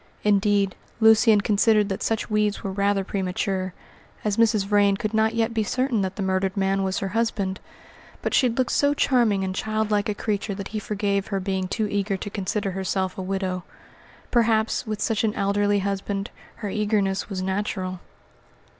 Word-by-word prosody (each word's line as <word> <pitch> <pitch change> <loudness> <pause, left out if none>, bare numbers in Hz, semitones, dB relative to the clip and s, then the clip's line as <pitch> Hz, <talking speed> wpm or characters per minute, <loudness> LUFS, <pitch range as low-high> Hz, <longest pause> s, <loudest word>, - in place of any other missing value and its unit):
Indeed, 200 -1 +2 0.2
Lucian 220 -1 +6
considered 210 0 +3
that 195 - -3
such 225 -1 -1
weeds 210 -1 0
were 195 - -2
rather 200 0 +1
premature, 185 0 -2 0.5
as 210 -1 +1
Mrs. 225 -3 +3
Vrain 200 -1 +3
could 215 0 -3
not 220 +1 +2
yet 230 0 +1
be 225 - +1
certain 255 0 0
that 190 0 -2
the 200 - -3
murdered 190 +1 0
man 195 0 +1
was 190 0 -1
her 195 - -2
husband; 205 -3 -1 0.6
but - - -1
she 255 - +4
looked 245 +2 0
so 285 0 +2
charming 235 -9 +2
and 190 0 -2
childlike 215 0 0
a 210 - -1
creature 205 -1 -2
that 200 0 -6
he 215 - -3
forgave 200 -1 -1
her 195 -2 -1
being 190 -1 -2
too 215 +3 -1
eager 200 -1 -1
to 205 - -6
consider 200 0 -2
herself 190 0 -2
a - - -5
widow. 185 -1 -2 0.7
Perhaps 225 -1 +2
with 215 -1 -3
such 225 -2 0
an 220 -1 0
elderly 205 +1 +1
husband 200 +1 -2 0.2
her 210 -3 -5
eagerness 205 -2 0
was 185 -2 -3
natural. 190 -1 -2
205 Hz, 175 wpm, -24 LUFS, 195-215 Hz, 0.7 s, Lucian